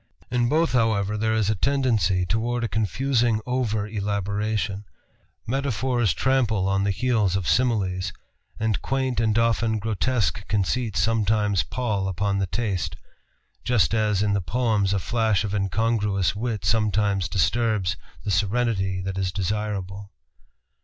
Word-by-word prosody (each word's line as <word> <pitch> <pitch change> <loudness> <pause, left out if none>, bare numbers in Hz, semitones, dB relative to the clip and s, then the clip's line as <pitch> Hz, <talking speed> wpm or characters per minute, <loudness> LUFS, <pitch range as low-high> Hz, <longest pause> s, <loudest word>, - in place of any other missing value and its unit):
In 120 -1 +1
both, 160 +3 +2
however, 110 -4 +1
there 110 +1 0
is 110 -1 +2
a - - +2
tendency 115 -7 +1
toward 115 +6 -1
a - - +1
confusing 115 +2 +1
over 115 -5 -1
elaboration 100 0 -2 0.6
Metaphors 125 - 0
trample 115 -7 +1
on 100 0 +1
the - - +1
heels 105 -2 +1
of 95 -3 -2
Similes, 95 -7 +1 0.5
and 110 -2 0
quaint 130 -3 -1
and 110 -1 +2
often 115 -1 +2
grotesque 105 -3 -1
conceits 105 +3 0
sometimes 105 -3 +2
pall 105 -6 -2
upon 100 +1 -1
the 95 - 0
taste, 100 -4 -2 0.7
just 115 -6 +2
as 105 -3 +1
in 105 -1 +1
the 100 - +1
poems 105 0 +1
a 100 - +2
flash 110 +1 +1
of 105 -1 -3
incongruous 100 -2 0
wit 110 -1 -3
sometimes 105 -3 +1
disturbs 105 -2 +1 0.3
the 105 - -2
serenity 100 -2 0
that 95 0 -3
is 95 -1 -1
desirable. 100 0 -3
105 Hz, 135 wpm, -24 LUFS, 100-115 Hz, 0.7 s, both